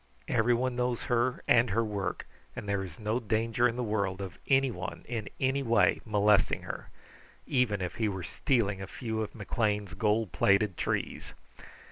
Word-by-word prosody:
Everyone 120 +2 +2
knows 125 -1 -1
her 120 +1 0
and 120 0 +5
her 115 +4 +1
work, 100 -4 -3 0.3
and - - -6
there 100 -1 0
is 90 -4 -9
no 110 +2 -1
danger 115 +2 +1
in 115 - -3
the 125 - -2
world 100 -4 -1
of 95 -3 -7
anyone 135 -3 0
in 115 -3 -4
any 135 +1 +1
way 115 -3 +3
molesting 105 -1 +3
her, - - -7 0.6
even 125 -7 +1
if 90 - -4
he 110 -2 +1
were 95 -2 -4
stealing 100 - 0
a 95 - -5
few 110 +1 -3
of 110 - -5
McLean's 105 -2 -1
gold 110 -3 +1
plated 100 +3 +3
trees. - - -3
110 Hz, 165 wpm, -30 LUFS, 100-120 Hz, 0.6 s, and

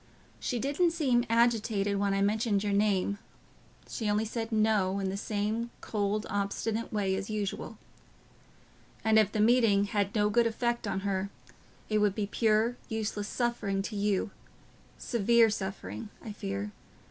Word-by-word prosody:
She 245 - -2
didn't 285 +8 +2
seem 255 -7 +2
agitated 225 -3 +2
when 200 -1 +1
I 195 - +2
mentioned 210 0 +1
your 205 -1 0
name; 200 -1 +1 0.7
she 220 -4 -3
only 210 +2 +1
said 225 +1 -4
'No,' 215 -3 +2
in 195 -1 -1
the 190 - -3
same 215 +3 -2
cold, 210 0 -1
obstinate 205 +3 -2
way 200 -3 0
as 195 +2 -3
usual. 210 -2 -3 1.3
And 220 0 +6
if 210 -2 +3
the 215 - -2
meeting 220 -3 +4
had 205 0 -1
no 210 -1 +2
good 235 +2 +4
effect 235 0 -1
on 195 -1 -1
her, 195 0 -1 0.6
it 215 -1 +1
would 205 -2 +2
be 210 - -1
pure, 220 +3 +2
useless 215 -2 -2
suffering 215 -6 -1
to 210 - -5
you—severe 210 +3 0
suffering, 190 - -5 0.2
I 220 - -5
fear. 100 - -4
210 Hz, 145 wpm, -30 LUFS, 200-225 Hz, 1.3 s, And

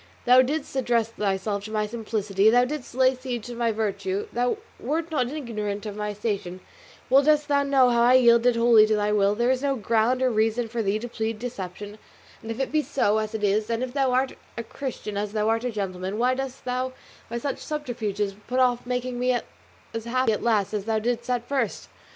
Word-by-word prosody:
Thou 250 +1 +7
didst 280 +2 -2
address 235 -3 +1
thyself 200 -1 -2
to 215 - -8
my 215 -1 0
simplicity, 210 -2 +1
thou 245 +2 +5
didst 265 -3 -6
lay 260 0 +4
siege 250 -3 -5
to 245 - -6
my 235 -1 0
virtue, 200 -2 -2
thou 245 - 0 0.2
wert 325 +2 -2
not 255 -6 0
ignorant 215 -8 -4
of 210 -1 -5
my 210 0 -3
station, 200 -3 -3 0.5
well 270 +2 +6
dost 300 0 +3
thou 285 -1 +3
know 270 -3 +4
how 235 0 +3
I 245 +1 +5
yielded 235 -1 +5
wholly 230 -2 +6
to 215 - +2
thy 210 0 0
will; 205 -1 +3
there 240 +3 +2
is 260 0 0
no 280 -1 +1
ground 230 +2 +1
or 255 - +3
reason 225 +2 +1
for 230 +1 -3
thee 200 0 0
to 235 +3 -5
plead 225 -1 -3
deception, 205 -3 -7 0.4
and 225 - -9
if 225 - -4
it 270 - -1
be 310 - +2
so, 220 -7 +1
as 215 0 -4
it 215 - -4
is, 210 +2 +1
and 230 +1 -1
if 255 -1 -5
thou 270 -2 +1
art 260 +1 +1 0.2
a 235 - -3
Christian 225 -4 -6
as 205 0 -3
thou 215 -1 0
art 225 +2 0
a - - 0
gentleman, 190 -1 -4
why 250 +2 +2
dost 270 0 -5
thou 255 +1 -2 0.4
by 235 - -3
such 275 +3 -3
subterfuges 220 -9 -3
put 250 - -2
off 245 -1 +2
making 250 0 -2
me 250 0 +2 0.6
as 225 0 -4
happy 255 0 +1
at 210 - -1
last 215 -4 +1
as 205 -2 -2
thou 225 -1 0
didst 235 +3 -2
at 245 -1 -1
first? 265 -6 -2
235 Hz, 220 wpm, -25 LUFS, 210-255 Hz, 0.6 s, Thou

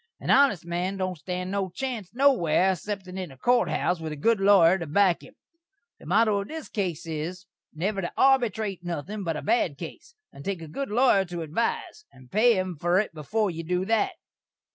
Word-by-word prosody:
An - - -1
honest 265 - +4
man 175 +3 -2
don't 185 -3 -3
stan 180 +4 -4
no 195 -1 -1
chance 225 0 -4
nowhere 225 - +3
xceptin' 190 0 -5
in 185 -3 -5
a 135 - -14
court 245 - +2
house 175 -1 0
with 160 -1 -5
a - - -4
good 225 +9 +2
lawyer 190 -2 +5
to 170 - -5
back 180 +3 +3
him. 260 - -15 0.6
The - - -13
motto 205 +2 +3
of 200 - -7
this 320 -1 -7
case 180 -7 -3
is, 165 +3 -5 0.3
never 195 +5 -2
to 175 - -4
arbytrate 220 -8 +2
nuthin' 175 +5 -4
but 165 -3 -2
a - - -6
bad 205 - +1
case, 475 - -10 0.2
and 140 - -11
take 190 -2 -3
a - - -8
good 275 - -4
lawyer 225 -3 +4
to 175 -2 -5
advise, 340 - -3
and 130 -1 -18
pay 225 +1 +4
him 185 -3 -2
fur 175 +4 +1
it 205 -4 0
before 200 +7 -1
you 165 0 -6
do 180 +3 -1
that. 225 - +1
190 Hz, 205 wpm, -26 LUFS, 170-220 Hz, 0.6 s, lawyer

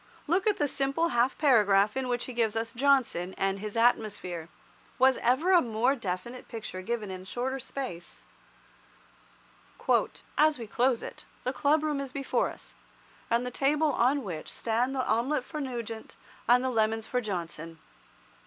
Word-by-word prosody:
Look 365 +6 +1
at 420 - +3
the 290 - +1
simple 275 +5 0
half 245 -2 +2
paragraph 210 -8 +4
in 265 -1 -1
which 245 -1 -1
he 255 - -7
gives 225 -2 +1
us 225 0 -2
Johnson 245 -9 +2
and 195 0 0
his 215 +2 -5
atmosphere. 205 -8 +1 0.5
Was 260 0 +5
ever 265 +10 +2
a 360 -2 +7
more 240 +3 +1
definite 230 +2 -5
picture 215 -5 -6
given 215 0 -3
in 185 -1 -6
a - - -13
shorter 260 +6 -3
space— 250 -10 -7 2.1
"As 305 0 +5
we 235 - -6
close 245 +3 +1
it, - - -8 0.2
the 255 - -1
club 295 +4 +2
room 300 -2 0
is 275 -2 -5
before 275 0 0
us, - - -11 0.6
and 235 +2 +2
the 250 - -4
table 295 +4 +2
on 260 +4 +2
which 170 -7 -6
stand 240 +4 0
the 260 - 0
omelet 245 +5 +1
for 305 -2 -5
Nugent, 235 -4 -5 0.3
and 250 +1 +6
the 260 - 0
lemons 220 -1 +1
for 250 - -1
Johnson. 165 -5 -5
245 Hz, 165 wpm, -29 LUFS, 215-270 Hz, 2.1 s, a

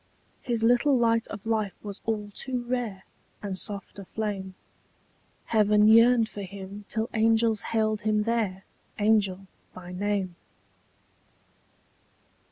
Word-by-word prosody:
His 235 -2 -1
little 245 +4 +4
light 230 -1 +2
of 205 -1 -8
life 215 -3 -1
was 205 -1 -7
all 210 -2 -2
too 250 +1 -3
rare 240 -6 -3 0.4
And 200 -2 -3
soft 200 +1 -3
a 195 - -8
flame: 195 -3 -4 0.9
Heaven 210 -1 +4
yearned 230 +1 +6
for 205 - -8
him 200 +1 -8
till 225 0 -1
angels 225 -1 +3
hailed 215 -1 0
him 215 -1 +1
there 210 -5 -1 0.3
Angel 205 -3 +2 0.3
by 180 -1 -9
name. 190 -1 -2
215 Hz, 120 wpm, -27 LUFS, 200-225 Hz, 0.9 s, yearned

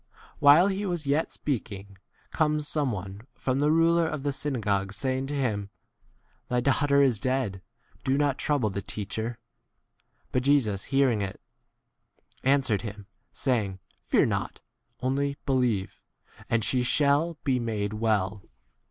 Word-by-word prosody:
While 145 +5 +7
he 200 +1 -2
was 175 -6 -2
yet 145 +3 +1
speaking, 100 -8 -4 0.4
comes 150 -1 +1
some 145 -5 0
one 100 +3 -7
from 130 0 -1
the 145 +1 +3
ruler 165 +1 +4
of 150 -3 -4
the 145 - 0
synagogue, 105 -9 -1
saying 130 +4 -2
to 145 - -3
him, 105 -7 -1 0.8
Thy 125 - +2
daughter 140 +2 +3
is 125 -6 +2
dead; 130 -6 -1 0.4
do 130 - +1
50 - - +2
not 145 -2 +1
trouble 135 -8 +1
the 100 - -3
teacher. 110 +4 -4 0.9
But 125 - +1
Jesus 125 -8 +2
hearing 135 -6 +2
it, 95 -1 -4 1.0
answered 130 -6 +3
him, 105 -2 -7 0.3
saying, 110 -8 -1 0.2
Fear - - +3
not: - - -2 0.4
only 140 +2 0
believe, 125 -8 0 0.4
51 - - -17
and 115 -1 +2
she 125 +3 +1
shall 145 +5 +2
be 130 -4 +1
made 110 -3 -2
well. 105 -2 0
130 Hz, 145 wpm, -27 LUFS, 105-145 Hz, 1.0 s, While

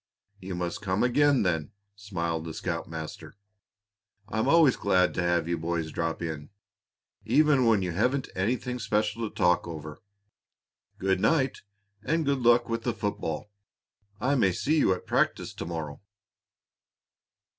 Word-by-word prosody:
"You 95 -1 -6
must 90 -1 -3
come 95 +1 0
again, 140 +2 +3
then," 80 -5 -1 0.2
smiled 85 -5 -3
the 80 -1 -6
scoutmaster. 80 0 -5 0.9
"I'm 110 0 -1
always 160 -6 +5
glad 90 -2 +2
to - - -1
have 85 -2 +1
you 85 -1 -1
boys 80 -1 -2
drop 80 +1 -2
in, 80 -3 -5 0.7
even 145 -4 +4
when 105 -4 +3
you 90 - -2
haven't 125 +9 0
anything 125 +5 -1
special 110 0 -1
to - - -24
talk 90 0 +2
over. 75 -2 -8 1.0
Good 95 0 +1
night; 135 +1 +1 0.4
and 160 +6 0
good 140 -1 +1
luck 120 0 +4
with 115 -1 -2
the 120 0 -1
football. 100 -1 -3 0.7
I 135 +3 +1
may 100 -9 +3
see 155 - +1
you 95 - +3
at 90 - -2
practice - - 0
to - - -6
morrow." 80 -4 -5
95 Hz, 145 wpm, -28 LUFS, 85-120 Hz, 1.0 s, always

